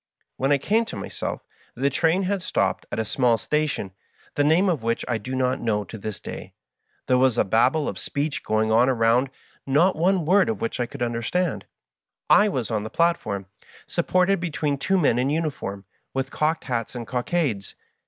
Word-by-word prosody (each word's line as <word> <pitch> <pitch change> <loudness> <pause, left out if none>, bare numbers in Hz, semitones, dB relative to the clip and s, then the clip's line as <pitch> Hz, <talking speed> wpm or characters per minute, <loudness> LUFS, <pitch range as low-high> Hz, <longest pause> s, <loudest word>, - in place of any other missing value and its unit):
When 135 +2 0
I 145 - +5
came 215 +11 +1
to - - -7
myself 100 - -5 0.3
the 140 +3 +1
train 165 +6 +2
had 195 +1 -1
stopped - - -1
at - - -3
a 110 - 0
small 120 +1 +2
station, 150 -8 -1 0.4
the 145 - +1
name 165 +7 +4
of 165 -9 +1
which 115 +1 -1
I 120 -2 0
do 130 +5 -5
not 130 0 0
know 105 -3 0
to 100 - -10
this 110 -1 -6
day. - - -8 0.5
There 125 0 +3
was 130 -2 +3
a - - +4
Babel 125 +9 +2
of - - -4
speech 145 +1 -2
going 110 0 +1
on 120 +4 +5
around, 120 +1 +3 0.4
not 160 +8 +3
one 180 +1 +2
word 195 +5 +4
of 225 - -2
which 230 - -3
I 120 - 0
could 120 - -5
understand. 120 +9 -1 0.7
I 210 0 +6
was 125 - -3
on 110 -2 0
the 110 - -5
platform, 110 - 0 0.4
supported 185 +1 +1
between 155 -4 -2
two 190 +7 +1
men 140 -8 +3
in 130 +2 +1
uniform, 145 -11 -3 0.3
with 135 0 -2
cocked 155 +1 0
hats 120 -2 -3
and 120 -1 -5
cockades. 125 - -2
135 Hz, 190 wpm, -24 LUFS, 115-165 Hz, 0.7 s, I